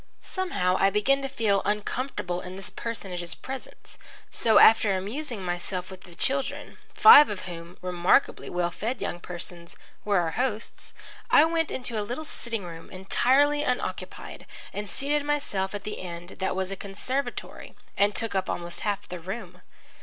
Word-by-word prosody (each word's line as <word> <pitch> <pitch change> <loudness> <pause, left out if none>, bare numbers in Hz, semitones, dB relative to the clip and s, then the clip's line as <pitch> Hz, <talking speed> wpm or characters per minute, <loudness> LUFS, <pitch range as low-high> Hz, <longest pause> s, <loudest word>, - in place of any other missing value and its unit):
Somehow 190 - 0
I 195 - +5
began 240 +8 +2
to 270 - -3
feel 215 -6 +1
uncomfortable 210 -3 -2
in 180 0 -8
this 195 - -8
personage's 180 -7 -4
presence. 265 0 -9 0.3
So, 225 -2 +3
after 215 -3 +7
amusing 220 +2 -3
myself 180 +1 -4
with 190 0 -11
the 175 -2 -13
children, 270 +8 -1 0.2
five 300 - +10
of 205 -2 -4
whom, 170 0 -8
remarkably 180 +7 +2
well 175 -1 -1
fed 230 +8 -3
young 175 - -3
persons, 175 -1 -9 0.3
were 205 -1 +2
our 170 -2 +1
host's, 235 -1 -3 0.3
I 305 - +7
went 325 -1 0
into 240 -3 -3
a - - 0
little 245 +9 -4
sitting 230 -7 -4
room, 165 -2 -9
entirely 265 +10 +3
unoccupied, 250 -4 -4 0.3
and 205 0 -5
seated 285 +8 -1
myself 210 -10 -1
at 205 - -6
the 210 - -5
end 175 -1 -7
that 190 -1 -1
was 190 0 -2
a - - -2
conservatory 210 +8 -4 0.2
and 200 +1 +3
took 225 -2 -2
up 190 -1 -1
almost 175 0 -4
half 205 -1 -2
the 180 - -6
room. 180 0 -7
200 Hz, 160 wpm, -27 LUFS, 180-255 Hz, 0.3 s, five